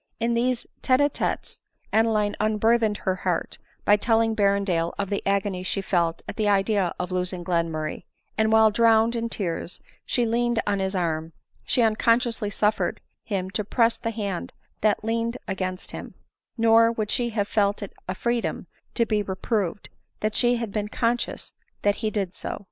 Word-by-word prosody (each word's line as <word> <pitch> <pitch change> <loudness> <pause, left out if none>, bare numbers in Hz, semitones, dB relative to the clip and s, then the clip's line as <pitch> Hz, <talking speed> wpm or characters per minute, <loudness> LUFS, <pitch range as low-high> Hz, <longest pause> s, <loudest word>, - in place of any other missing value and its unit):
In 235 +1 +1
these 240 +1 0 0.2
tete 255 -1 +3
a 290 0 +4
tetes - - -3 0.3
Ade 225 +1 +4
line 210 -2 +1
unburthened 215 0 +2
her 190 -1 -1
heart, 180 -3 -2 0.3
by 205 - +6
telling 225 +1 +2
Berrendale 200 -5 +1
of 200 -1 -3
the 200 - 0
agony 195 -2 0
she 185 +2 -2
felt 170 -4 0
at - - -6
the 215 -2 +2
idea 195 -2 +2
of 180 0 -4
losing 180 0 -2
Glenmurray; 165 -3 -1 0.3
and 220 0 +2
while 220 -1 +6
drowned 230 +1 +4
in 230 0 -2
tears 175 -5 -4 0.2
she 245 - +1
leaned 240 0 +1
on 200 -1 0
his 190 0 -1
arm, 165 -2 -1 0.3
she 245 - +2
unconsciously 230 0 +2
suffered 210 +1 0 0.2
him 190 -3 -3
to 210 - -1
press 230 +2 +2
the 230 - -2
hand 205 -5 -4 0.3
that 210 -1 +2
leaned 230 +2 -1
against 185 -1 -4
him; - - -8 0.4
nor 230 0 +5
would 215 -2 -2
she 240 -1 +1
have 210 -3 -1
felt 205 -1 +1
it 200 - -8
a 185 - -2
freedom 235 +3 -1 0.3
to 235 - +3
be 215 -2 +1
reproved, 200 0 -2 0.3
had 215 0 -1
she 240 0 +2
been 210 0 -3
conscious 235 +2 -2 0.3
that 205 0 +2
he 220 - -1
did 195 -4 -2
so. - - -5
210 Hz, 170 wpm, -25 LUFS, 190-230 Hz, 0.4 s, by